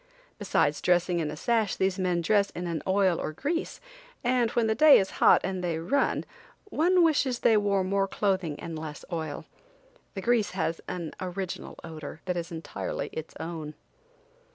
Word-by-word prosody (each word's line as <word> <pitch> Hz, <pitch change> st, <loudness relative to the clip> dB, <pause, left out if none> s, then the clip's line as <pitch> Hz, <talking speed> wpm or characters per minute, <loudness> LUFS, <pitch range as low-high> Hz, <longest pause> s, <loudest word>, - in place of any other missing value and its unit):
Besides -, -, +1 dB
dressing 175 Hz, 0 st, +2 dB
in 155 Hz, -2 st, -1 dB
a 150 Hz, -, -6 dB
sash 225 Hz, +1 st, +1 dB
these 190 Hz, 0 st, 0 dB
men 180 Hz, -2 st, +1 dB
dress 200 Hz, +3 st, +2 dB
in 175 Hz, -, -4 dB
an 170 Hz, -2 st, -2 dB
oil 190 Hz, -2 st, +3 dB
or -, -, -3 dB
grease, 320 Hz, -, -3 dB, 0.4 s
and 245 Hz, -1 st, +2 dB
when 235 Hz, 0 st, +1 dB
the 220 Hz, -, +2 dB
day 305 Hz, +5 st, +8 dB
is 195 Hz, -, 0 dB
hot -, -, +7 dB
and 185 Hz, -1 st, -3 dB
they 170 Hz, -2 st, -1 dB
run, 245 Hz, +13 st, 0 dB, 0.5 s
one 355 Hz, +3 st, +4 dB
wishes 280 Hz, -6 st, +2 dB
they 225 Hz, -, +5 dB
wore 200 Hz, -2 st, +2 dB
more 195 Hz, +1 st, +1 dB
clothing 190 Hz, -7 st, -1 dB
and 165 Hz, -2 st, -6 dB
less 155 Hz, -1 st, -7 dB
oil! 160 Hz, -3 st, -4 dB, 0.7 s
The 195 Hz, -, -3 dB
grease 235 Hz, -1 st, +2 dB
has 165 Hz, -1 st, -1 dB
an 170 Hz, -3 st, -5 dB
original 185 Hz, 0 st, -5 dB
odor 155 Hz, -1 st, -8 dB
that 180 Hz, -1 st, -1 dB
is 170 Hz, 0 st, -4 dB
entirely 165 Hz, -1 st, -4 dB
its 160 Hz, 0 st, -7 dB
own. 160 Hz, -2 st, -6 dB
185 Hz, 175 wpm, -28 LUFS, 165-220 Hz, 0.7 s, day